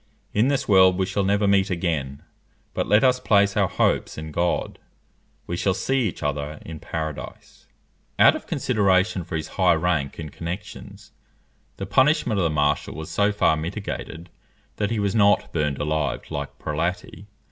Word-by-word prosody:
In 110 Hz, +4 st, +3 dB
this 140 Hz, -1 st, 0 dB
world 95 Hz, -2 st, +5 dB
we 95 Hz, -, +1 dB
shall 95 Hz, +2 st, -1 dB
never 100 Hz, +1 st, +2 dB
meet 100 Hz, -1 st, +3 dB
again; 80 Hz, -7 st, -2 dB, 0.5 s
but -, -, -2 dB
let 105 Hz, +1 st, +4 dB
us 125 Hz, -1 st, +4 dB
place 100 Hz, -5 st, +3 dB
our 100 Hz, -2 st, +3 dB
hopes -, -, 0 dB
in 80 Hz, 0 st, -6 dB
God; 85 Hz, +3 st, -1 dB, 0.7 s
we 85 Hz, -, -4 dB
shall 95 Hz, +1 st, 0 dB
see 130 Hz, +4 st, 0 dB
each 90 Hz, -, -6 dB
other 75 Hz, +1 st, -3 dB
in 80 Hz, -1 st, -8 dB
Paradise_." 80 Hz, -1 st, -7 dB, 0.5 s
Out -, -, +6 dB
of -, -, -8 dB
consideration 95 Hz, -2 st, +1 dB
for 85 Hz, -, -6 dB
his 80 Hz, -1 st, -3 dB
high 90 Hz, -2 st, +5 dB
rank 80 Hz, -4 st, -1 dB
and 75 Hz, -3 st, -7 dB
connexions, 90 Hz, +4 st, -8 dB, 0.7 s
the 95 Hz, -, -4 dB
punishment 130 Hz, -, +2 dB
of -, -, +1 dB
the -, -, +2 dB
marshal 75 Hz, -1 st, 0 dB
was 80 Hz, +1 st, -7 dB
so 100 Hz, +4 st, +2 dB
far 100 Hz, -6 st, +2 dB
mitigated, 85 Hz, 0 st, -6 dB, 0.5 s
that 105 Hz, -1 st, -1 dB
he 115 Hz, -, -2 dB
was 100 Hz, -2 st, 0 dB
not 105 Hz, -2 st, +3 dB
burned 75 Hz, -3 st, 0 dB
alive 75 Hz, -3 st, -1 dB
like 70 Hz, -1 st, -5 dB
Prelati. 95 Hz, +8 st, -4 dB
90 Hz, 170 wpm, -23 LUFS, 80-100 Hz, 0.7 s, Out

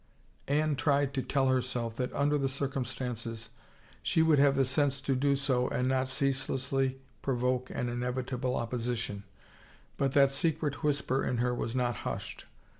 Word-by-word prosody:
Anne 150 Hz, +1 st, +2 dB
tried 140 Hz, -1 st, +2 dB
to 135 Hz, -, 0 dB
tell 135 Hz, 0 st, +1 dB
herself 125 Hz, -3 st, -1 dB
that 125 Hz, +1 st, -2 dB
under 145 Hz, +1 st, +2 dB
the 135 Hz, -2 st, +1 dB
cir 140 Hz, +1 st, -1 dB
cumstances 120 Hz, -3 st, -4 dB, 0.5 s
she 160 Hz, -, +2 dB
would 160 Hz, -3 st, +4 dB
have 140 Hz, -1 st, +5 dB
the 135 Hz, 0 st, +3 dB
sense 140 Hz, +1 st, +1 dB
to 135 Hz, 0 st, 0 dB
do 140 Hz, +2 st, +2 dB
so 130 Hz, -3 st, +1 dB
and 125 Hz, -, 0 dB
not 130 Hz, 0 st, +1 dB
ceaselessly 135 Hz, 0 st, -1 dB, 0.2 s
provoke 125 Hz, -1 st, 0 dB
an 125 Hz, -, -2 dB
inevitable 125 Hz, +1 st, -2 dB
opposition, 115 Hz, -3 st, -3 dB, 0.7 s
but 135 Hz, -1 st, +1 dB
that 140 Hz, -1 st, +5 dB
secret 145 Hz, 0 st, -1 dB
whisper 140 Hz, -3 st, +1 dB
in 125 Hz, -, 0 dB
her 125 Hz, +1 st, +1 dB
was 120 Hz, 0 st, -3 dB
not 120 Hz, -3 st, 0 dB
hushed. -, -, -5 dB
130 Hz, 160 wpm, -31 LUFS, 125-140 Hz, 0.7 s, have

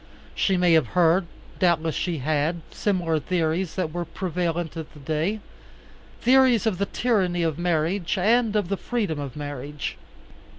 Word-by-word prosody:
She 190 Hz, -2 st, +1 dB
may 180 Hz, -1 st, +4 dB
have 160 Hz, -2 st, +4 dB
heard, 175 Hz, +1 st, +4 dB, 0.3 s
doubtless 165 Hz, -3 st, +2 dB
she 175 Hz, +1 st, -2 dB
had, 155 Hz, +4 st, 0 dB
similar 175 Hz, -6 st, 0 dB
theories 165 Hz, +2 st, -1 dB
that 165 Hz, -5 st, -2 dB
were 175 Hz, 0 st, -2 dB
prevalent 175 Hz, -2 st, -3 dB
at 160 Hz, -2 st, -6 dB
that 145 Hz, -2 st, -13 dB
day, 165 Hz, +9 st, -1 dB, 0.8 s
theories 255 Hz, -3 st, +5 dB
of 200 Hz, -5 st, 0 dB
the 200 Hz, -, 0 dB
tyranny 185 Hz, -8 st, +1 dB
of 160 Hz, -1 st, -1 dB
marriage 175 Hz, +2 st, 0 dB
and 220 Hz, +3 st, +3 dB
of 205 Hz, -4 st, +1 dB
the 200 Hz, -, 0 dB
freedom 205 Hz, -12 st, -2 dB
of 140 Hz, -3 st, -6 dB
marriage. 145 Hz, 0 st, -5 dB
175 Hz, 155 wpm, -25 LUFS, 160-195 Hz, 0.8 s, theories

